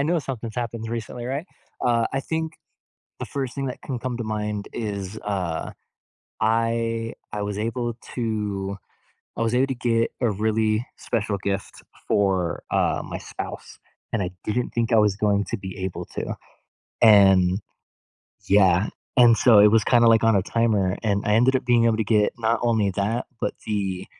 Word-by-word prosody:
I -, -, +3 dB
know 170 Hz, +3 st, +1 dB
something's 120 Hz, -5 st, -5 dB
happened 115 Hz, -2 st, -3 dB
recently, 120 Hz, +1 st, -5 dB
right? 140 Hz, +7 st, -3 dB, 0.3 s
Uh, 120 Hz, -2 st, +2 dB
I 135 Hz, -, 0 dB
think 160 Hz, +2 st, -3 dB, 0.6 s
the -, -, -4 dB
first 135 Hz, -3 st, -4 dB
thing 135 Hz, -1 st, -3 dB
that 125 Hz, -, -5 dB
can 130 Hz, -3 st, -4 dB
come 125 Hz, 0 st, -4 dB
to 115 Hz, -, -3 dB
mind 105 Hz, -1 st, -3 dB
is, 100 Hz, -2 st, -4 dB
uh, 95 Hz, -5 st, -2 dB, 0.7 s
I 115 Hz, 0 st, 0 dB, 0.2 s
I 105 Hz, -, -3 dB
was 100 Hz, 0 st, -3 dB
able 120 Hz, +1 st, -2 dB, 0.2 s
to 105 Hz, -4 st, -2 dB, 0.6 s
I -, -, -1 dB
was 115 Hz, +1 st, +1 dB
able 130 Hz, +2 st, +3 dB
to 135 Hz, -, -1 dB
get 115 Hz, -1 st, +1 dB
a 120 Hz, -, +2 dB
really 110 Hz, +2 st, 0 dB
special 105 Hz, -3 st, -2 dB
gift 100 Hz, 0 st, -4 dB, 0.3 s
for, 95 Hz, -4 st, +1 dB
uh, -, -, +1 dB
my -, -, -5 dB
spouse, -, -, -8 dB, 0.3 s
and 115 Hz, -, 0 dB
I 90 Hz, -, -2 dB
didn't 120 Hz, +3 st, -1 dB
think 120 Hz, 0 st, -1 dB
I -, -, +6 dB
was 105 Hz, -2 st, +4 dB
going 100 Hz, -1 st, +1 dB
to -, -, -1 dB
be 95 Hz, -1 st, -7 dB
able 95 Hz, -, -4 dB
to. -, -, -3 dB, 0.7 s
And 95 Hz, -3 st, +6 dB, 0.9 s
Y 100 Hz, -, +5 dB
eah, 95 Hz, 0 st, +3 dB, 0.3 s
and 120 Hz, -2 st, +7 dB
so 115 Hz, -4 st, +6 dB
it 105 Hz, -, +8 dB
was 110 Hz, 0 st, +4 dB
kinda 120 Hz, -2 st, +4 dB
like 115 Hz, -1 st, +5 dB
on 115 Hz, -2 st, +4 dB
a 95 Hz, -, +2 dB
timer, 105 Hz, -3 st, +1 dB
and 100 Hz, -3 st, 0 dB
I 105 Hz, -, +3 dB
ended 130 Hz, +4 st, +4 dB
up -, -, -4 dB
being 120 Hz, -2 st, +4 dB
able 115 Hz, -1 st, +3 dB
to 110 Hz, -, +1 dB
get 105 Hz, -1 st, +2 dB
not 115 Hz, 0 st, +1 dB
only 110 Hz, -4 st, +2 dB
that, 105 Hz, +6 st, -1 dB
but -, -, -1 dB
the, 95 Hz, -3 st, -2 dB
110 Hz, 180 wpm, -24 LUFS, 100-120 Hz, 0.9 s, it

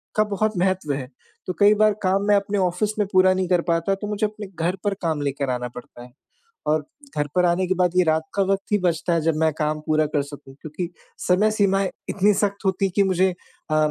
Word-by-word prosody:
का 215 Hz, -, +4 dB
बहुत 210 Hz, -1 st, -1 dB
महत्व 180 Hz, -5 st, 0 dB
है, 135 Hz, -2 st, -4 dB, 0.4 s
तो 185 Hz, -, -1 dB
कई 205 Hz, +1 st, +6 dB
बार 215 Hz, 0 st, +4 dB
काम 195 Hz, +2 st, +2 dB
मैं 205 Hz, -, +5 dB
अपने 200 Hz, +1 st, 0 dB
ऑफ़िस 185 Hz, +3 st, 0 dB
में 205 Hz, -, +1 dB
पूरा 185 Hz, 0 st, +5 dB
नहीं 185 Hz, -1 st, -1 dB
कर 180 Hz, -2 st, +3 dB
पाता, 170 Hz, +3 st, 0 dB
तो 210 Hz, +1 st, -6 dB
मुझे 210 Hz, +1 st, -1 dB
अपने 210 Hz, -1 st, -6 dB, 0.2 s
घर 180 Hz, +2 st, +1 dB
पर 205 Hz, -1 st, +1 dB
काम 160 Hz, -3 st, -1 dB
लेकर 140 Hz, -1 st, -2 dB
आना 125 Hz, -1 st, -2 dB
पड़ता 120 Hz, 0 st, -11 dB
है 125 Hz, -, -14 dB, 0.6 s
और 150 Hz, -1 st, +1 dB, 0.3 s
घर 145 Hz, -, 0 dB
पर 180 Hz, 0 st, +4 dB
आने 175 Hz, +2 st, +2 dB
के 185 Hz, -, +2 dB
बाद 180 Hz, -1 st, +2 dB
ये 180 Hz, -, +6 dB
रात 160 Hz, 0 st, +2 dB
का 200 Hz, -, +2 dB
वक़्त 195 Hz, +1 st, -2 dB
ही 210 Hz, -, +4 dB
बचता 170 Hz, 0 st, +1 dB
है 165 Hz, -, +1 dB
जब 160 Hz, 0 st, +1 dB
मैं 160 Hz, 0 st, +2 dB
काम 155 Hz, 0 st, -1 dB
पूरा 155 Hz, 0 st, +2 dB
कर 145 Hz, -, +3 dB
सकूँ 145 Hz, -2 st, -12 dB
क्योंकि 165 Hz, +3 st, -5 dB, 0.4 s
समय 205 Hz, +4 st, +3 dB
सीमाएँ 195 Hz, -2 st, +2 dB, 0.2 s
इतनी 205 Hz, +2 st, +3 dB
सख़्त 200 Hz, 0 st, -1 dB
होती 190 Hz, +1 st, +1 dB
है 190 Hz, -, -1 dB
कि 200 Hz, -, +4 dB
मुझे 190 Hz, 0 st, +2 dB, 0.4 s
अ, -, -, +2 dB
185 Hz, 235 wpm, -23 LUFS, 155-200 Hz, 0.6 s, कई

